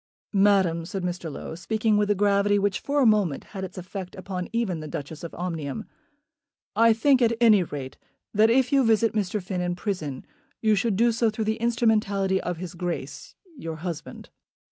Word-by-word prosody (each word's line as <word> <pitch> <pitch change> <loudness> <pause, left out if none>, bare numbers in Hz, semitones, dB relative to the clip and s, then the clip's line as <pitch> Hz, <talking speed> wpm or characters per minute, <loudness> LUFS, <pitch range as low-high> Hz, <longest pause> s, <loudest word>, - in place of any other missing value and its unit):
"Madam," 195 -4 +3
said 185 +2 -5
Mr. 175 -2 -3
Low, 140 - -7
speaking 215 +5 0
with 205 0 +2
a 205 - +3
gravity 205 0 +3
which 200 -1 0
for 285 0 0
a - - +4
moment 205 -10 +2
had 190 -2 -5
its 190 - -7
effect 185 0 -7
even - - -15
upon 185 +1 -3
the 155 - -7
Duchess 150 +2 -7
of 170 - -7
Omnium, 165 -6 -4 0.9
"I 230 +2 +6
think, 260 +4 +3
at 230 -1 +3
any 220 -4 +6
rate, 140 -6 -6 0.4
that 215 +1 +5
if 255 +2 +3
you 275 -1 +5
visit 225 -1 +3
Mr. 210 -1 -1
Finn 185 -1 -3
in 175 0 -1
prison, 175 -9 -4 0.3
you 220 -1 +3
should 210 +1 +1
do 235 +4 +3
so 230 0 +2
through 220 0 -3
the 220 +1 0
instrumentality 210 -5 +1
of 180 -1 -3
his 180 +1 -7
Grace, 175 0 -5 0.2
your 165 -1 -5
husband." 165 0 -7
200 Hz, 190 wpm, -25 LUFS, 175-220 Hz, 0.9 s, I